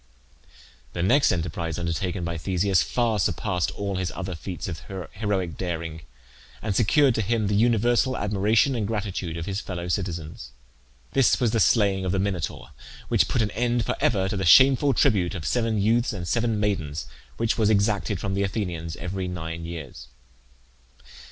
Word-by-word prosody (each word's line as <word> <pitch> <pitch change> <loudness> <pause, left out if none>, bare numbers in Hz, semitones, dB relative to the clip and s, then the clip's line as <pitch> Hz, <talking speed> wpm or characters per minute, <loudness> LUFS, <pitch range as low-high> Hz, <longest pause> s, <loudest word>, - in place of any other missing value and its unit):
The 85 - -2
next 140 +10 +4
enterprise 80 -1 -3
undertaken 85 +1 -2
by 85 0 -3
Theseus 90 +1 +1
far 115 +3 0
surpassed 90 +1 0
all 100 -2 -2
his 90 -2 -2
other 95 0 -4
feats 85 +1 -6
of 80 -5 -5 0.3
heroic 100 -5 -2
daring, 85 -3 -4 0.6
and 105 -3 -3
secured 135 +6 +4
to 110 - 0
him 110 +1 0
the 100 - 0
universal 120 +4 +2
admiration 105 +6 +2
and 110 -5 -1
gratitude 100 -6 -3
of 85 - -4
his 100 +1 -2
fellow 90 -2 -5
citizens. 85 -4 -4 0.6
This 135 -3 +3
was 120 -4 +2
the 115 - +1
slaying 100 -4 +3
of 95 - -1
the - - +1
Minotaur, 95 -7 -3 0.4
which - - +3
put 120 - +1
an 105 - -2
end 120 +1 0
for - - -1
ever 95 -5 +2
to 100 - -2
the 95 - -1
shameful 135 +8 +6
tribute 95 -2 +2
of 80 -4 -6
seven 115 -3 0
youths 115 +4 +2
and 90 -4 -5
seven 115 -1 0
maidens 80 -8 -2 0.3
which 115 0 0
was 110 -1 +3
exacted 100 -2 +1
from 95 0 -3
the 100 - 0
Athenians 90 -5 -3
every 90 +1 -4
nine 85 -2 -5
years. 80 -5 -8
100 Hz, 170 wpm, -25 LUFS, 85-110 Hz, 0.6 s, shameful